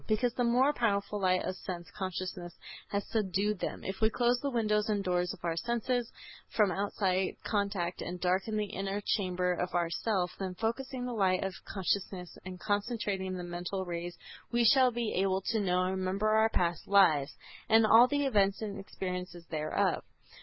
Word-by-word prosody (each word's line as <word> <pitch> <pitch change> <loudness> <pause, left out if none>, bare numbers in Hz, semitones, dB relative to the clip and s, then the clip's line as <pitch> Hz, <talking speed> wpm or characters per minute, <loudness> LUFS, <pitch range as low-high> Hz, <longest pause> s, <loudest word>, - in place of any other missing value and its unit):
Because 235 +2 +1
the 245 - 0
more 250 +5 +4
powerful 210 -4 0
light 185 -1 +2
of 185 - -3
sense 175 -2 -6
consciousness 185 -2 -5 0.3
has 200 0 -2
subdued 210 -2 0
them. - - -4
If 190 +2 -5
we 220 - +5
close 245 +1 +2
the 280 - -2
windows 215 -4 +1
and 205 -2 0
doors 180 -1 0
of - - -9
our 165 -1 0
senses 240 +3 -1 0.4
from 210 -4 +3
outside 190 -1 0
contact 200 -4 -1
and 180 +1 -5
darken 190 +4 0
the 210 - 0
inner 195 +1 -2
chamber 180 -2 +1
of 180 +1 -3
our 170 -1 +1
self, 185 -3 0
then 190 -2 -3
by 180 - -21
focusing 250 +3 -2
the 250 - -3
light 190 -4 +2
of 195 -1 -2
consciousness 190 -2 -2
and 185 -1 -8
concentrating 205 -3 -1
the 180 - -5
mental 175 +2 -4
rays 175 0 -5 0.3
we 240 0 +3
shall 260 +2 +6
be 235 -2 -2
able 190 0 +1
to 225 - +1
know 180 -2 +2
and 185 +1 -1
remember 190 +3 0
our 220 +1 +4
past 170 -5 -1
lives, 155 -8 +4 0.3
and 225 0 +6
all 230 +3 +8
the 285 +1 0
events 200 -6 +2
and 200 -2 -4
experiences 180 -3 -5
thereof. 155 -1 0
195 Hz, 180 wpm, -31 LUFS, 180-220 Hz, 0.4 s, all